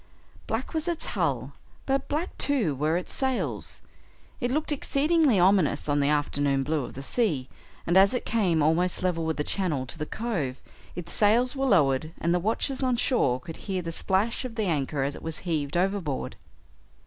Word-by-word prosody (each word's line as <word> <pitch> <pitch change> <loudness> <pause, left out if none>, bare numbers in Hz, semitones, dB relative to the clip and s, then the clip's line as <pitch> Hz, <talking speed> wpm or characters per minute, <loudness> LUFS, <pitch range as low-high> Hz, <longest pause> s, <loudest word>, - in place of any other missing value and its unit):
Black 225 +4 -3
was 320 +1 -1
its 340 -2 0
hull, - - -1 0.3
but 270 0 0
black 310 +5 -2
too 245 - +1
were 155 +5 0
its 180 - -3
sails. 265 -2 -2 0.6
It 245 -3 -1
looked 300 +4 -1
exceedingly 295 - +2
ominous 180 -6 +3
on 145 0 +2
the 140 0 +2
afternoon 145 -2 +1
blue 150 -1 -1
of - - -10
the 135 - -6
sea, 150 - 0 0.4
and 175 - +1
as 195 +1 +7
it 250 - -3
came 180 -9 +2
almost 175 +5 +1
level 170 -3 0
with 160 - -1
the 150 - 0
channel 155 -8 -1
to 130 - -5
the 150 - -3
cove, 170 - -3 0.4
its 175 -1 -3
sails 235 +5 +3
were 270 0 0
lowered 155 - +2
and 170 +1 +1
the 180 - +2
watchers 230 +8 0
on 255 -2 +2
shore 140 - +2
could 165 +3 -9
hear 190 -3 -3
the 165 - -4
splash 195 +9 0
of 250 -3 -6
the 220 -2 -1
anchor 145 -4 -1
as 140 +1 -2
it - - -10
was 160 -1 -3
heaved 155 -2 -1
overboard. 180 -7 -1
180 Hz, 190 wpm, -27 LUFS, 150-240 Hz, 0.6 s, as